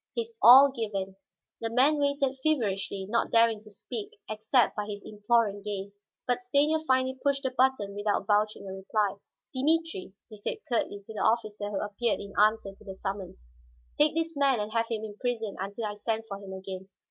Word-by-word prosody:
His 460 -1 -3
all 270 +3 +9
given, 200 -6 -3 0.4
the 225 - -2
man 270 +6 +4
waited 280 -2 0
feverishly, 200 -9 0
not 230 +4 0
daring 230 -2 +4
to 215 - -15
speak 420 - -7
except 220 +3 +2
by 210 -1 -3
his 205 -1 -6
imploring 210 -1 +1
gaze. 200 0 -6 0.3
But 245 -1 0
Stanief 295 +5 +2
finally 260 0 +1
pushed 280 -1 +1
the 260 - -1
button 255 -6 +1
without 205 0 -1
vouching 210 -1 +1
a 190 - -5
reply. 195 +1 -1 0.4
"Dimitri," 290 - 0
he 215 - -12
said 205 - -3
curtly 205 -4 -1
to 220 - -9
the 215 - -4
officer 215 -3 0
who 205 - -2
appeared 210 +2 -1
in 200 - -8
answer 210 -1 +2
to 195 - -19
the 195 -2 -8
summons, 190 - -6 0.5
"take 300 +1 +4
this 330 0 -1
man 275 -4 +3
and 210 +1 -3
have 230 0 0
him 220 -2 -3
imprisoned 220 0 -3
until 200 +4 -4
I 210 - -3
send 220 +2 -2
for 200 -2 -6
him 195 -1 -10
again. 190 0 -7
220 Hz, 185 wpm, -28 LUFS, 205-260 Hz, 0.5 s, all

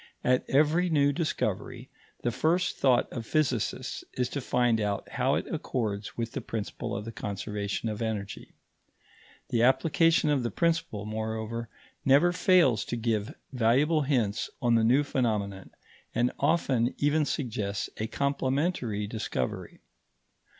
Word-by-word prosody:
At 125 0 +3
every 155 +6 +3
new 145 -3 +3
discovery, 165 +1 -2 0.4
the 120 - +1
first 175 +7 +1
thought 125 -3 +3
of 120 - -4
physicists 130 -1 -1
is 125 -1 -1
to 140 - -3
find 120 -3 +2
out 100 -1 -2
how - - +1
it - - -1
accords 105 -4 -3
with 115 -1 -2
the - - -4
principle 110 -3 -4
of 105 - -4
the 115 - -5
conservation 105 0 -4
of 110 0 -4
energy. 105 -3 -4 0.9
The 115 - +1
application 165 +5 +3
of 140 -3 +2
the 120 - -1
principle, 165 - -1
moreover, 110 +1 -4 0.3
never 140 +6 +5
fails 175 - +4
to - - -3
give 110 -2 -1 0.2
valuable 135 +7 +3
hints 125 -7 0
on 120 -3 +2
the 115 -1 +4
new 130 +6 +4
phenomenon, 105 -8 -1 0.5
and 120 +2 +2
often 135 -5 +1
even 150 +2 +2
suggests 110 -8 -2
a 110 - -2
complementary 135 - -1
discovery. 110 +1 -4
120 Hz, 135 wpm, -28 LUFS, 110-145 Hz, 0.9 s, never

